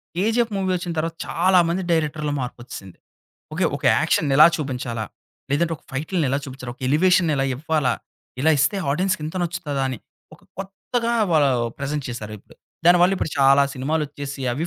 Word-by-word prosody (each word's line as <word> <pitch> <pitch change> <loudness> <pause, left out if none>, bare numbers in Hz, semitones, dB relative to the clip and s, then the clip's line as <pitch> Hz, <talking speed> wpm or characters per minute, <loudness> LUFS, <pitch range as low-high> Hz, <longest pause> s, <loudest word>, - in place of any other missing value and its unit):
'KGF' 225 +5 +1
movie 190 -1 0
ఒచ్చిన 175 -1 -4
తర్వాత 165 +1 -2
చాలామంది 180 0 +2
డైరెక్టర్‌లో 155 -2 0
మార్పొచ్చేసింది. 120 -6 -8 0.6
ఓకే - - 0
ఒక - - -13
యాక్షన్ 150 - +1
ఇలా 155 - +10
చూపించాలా? 125 -6 -4 0.5
లేదంటే 165 +4 +1
ఒక - - -29
ఫైటిల్ని 155 +4 -1
ఇలా 135 - +1
చూపించారు? 130 -2 -7
ఒక - - -38
ఎలివేషన్ 175 +3 +3
ఇలా 135 - +1
ఇవ్వాలా? 150 -2 0 0.5
ఇలా 160 - +4
ఇస్తే 150 +8 +2 0.2
ఆడియెన్స్‌కి 185 +1 0
ఇంత 160 +4 -6
నచ్చుతదా 150 -5 -3
అని, 130 -4 -4 0.4
ఒక - - -28 0.2
కొత్తగా 230 +5 -3 0.2
వాళ్ళ 150 -3 +4 0.3
ప్రెజెంట్ 140 0 -3
చేశారు 110 -3 -6
ఇప్పుడు. - - -21 0.3
దానివల్ల 180 +2 +6
ఇప్పుడు 160 - -3
చాలా 140 +1 +6
సినిమాలోచ్చేసి 145 0 -3
అవి 155 +6 -2
155 Hz, 155 wpm, -22 LUFS, 135-175 Hz, 0.6 s, ఇలా